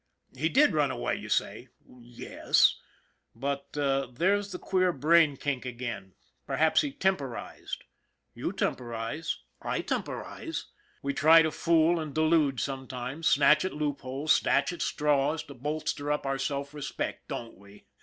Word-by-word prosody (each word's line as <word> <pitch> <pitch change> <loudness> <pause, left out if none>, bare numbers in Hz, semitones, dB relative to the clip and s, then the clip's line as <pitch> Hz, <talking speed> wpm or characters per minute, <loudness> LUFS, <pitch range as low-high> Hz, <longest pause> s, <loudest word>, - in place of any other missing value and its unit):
He 155 +5 0
did 285 - +4
run 150 -3 +2
away, 130 -2 -2
you - - -8
say. - - -1 0.2
Yes, 120 -1 +1 0.6
but 140 +3 -4
there's 145 +9 0
the 180 - -4
queer 185 0 +1
brain 155 -1 +4
kink 140 -2 -2
again. 120 -7 -6 0.3
Perhaps 160 0 +3
he 290 - -2
temporized. 190 - -3 0.5
You - - -3
temporize. 120 +6 -3 0.2
I - - -2
temporize. 325 - -4 0.4
We 280 - -1
try 165 - +7
to 160 - 0
fool 165 +1 +3
and 155 -3 -6
delude 155 -4 +3
sometimes, 130 +2 -4
snatch 150 +2 +5
at 185 - -2
loopholes, 145 0 -2
snatch 140 +5 +2
at 175 - -7
straws, 150 +1 +1
to 140 - -11
bolster 145 +2 -3
up 150 - -1
our 135 0 -1
self 140 +1 -3
respect, 150 -2 -5
don't 115 -4 -6
we? 100 +1 -17
145 Hz, 140 wpm, -29 LUFS, 130-160 Hz, 0.6 s, try